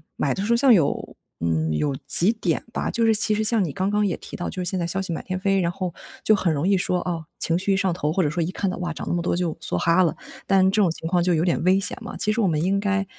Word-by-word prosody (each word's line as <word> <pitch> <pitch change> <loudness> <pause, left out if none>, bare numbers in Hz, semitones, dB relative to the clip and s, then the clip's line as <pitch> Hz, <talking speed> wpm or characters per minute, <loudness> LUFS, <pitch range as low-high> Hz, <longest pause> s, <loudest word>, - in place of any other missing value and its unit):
买 140 - 0
的 195 - -3
时 225 - -1
候 - - +4
像 260 +2 +4
有 165 -10 +1 0.2
嗯， 80 -1 0
有 140 - -1
几 185 +6 +3
点 180 -8 -1
吧。 - - -2
就 230 - 0
是 220 - +4
其 215 0 +3
实 215 +1 0
像 220 -1 +3
你 155 - -4
刚 190 +1 -1
刚 210 0 +1
也 185 - 0
提 - - -10
到， 175 - -4
就 185 -1 -4
是 175 - 0
现 185 -1 -2
在 170 - -1
消 185 +3 -1
息 190 -3 -4
满 - - -4
天 185 -1 -4
飞， 195 0 +1
然 170 -2 0
后 180 -1 -4 0.3
就 215 - +4
很 170 -5 0
容 150 +5 -1
易 195 - +3
说， 180 0 0
哦， 170 -3 -4
情 165 - +1
绪 195 +2 0
一 190 - +1
上 190 -2 +1
头 155 -3 -2
或 190 - +1
者 150 - +1
说 165 +2 -1
一 175 - -3
看 195 - -2
到， 185 - -4
哇， 175 -2 -3
涨 - - -7
那 - - 0
么 175 - -1
多 175 - 0
就 175 -3 -1
梭 160 - -3
哈 170 +2 +3
了。 165 - 0 0.3
但 190 -1 +4
这 205 +2 +1
种 185 -5 +3
情 165 - -6
况 175 -1 +2
就 180 0 +2
有 165 0 +1
点 175 -2 0
危 190 +2 +4
险 195 - -1
嘛， - - -7
其 215 - +1
实 230 - -1
我 200 - +3
们 155 -2 0
应 195 +2 +1
该 200 -1 0
185 Hz, 345 characters per minute, -23 LUFS, 170-195 Hz, 0.3 s, 候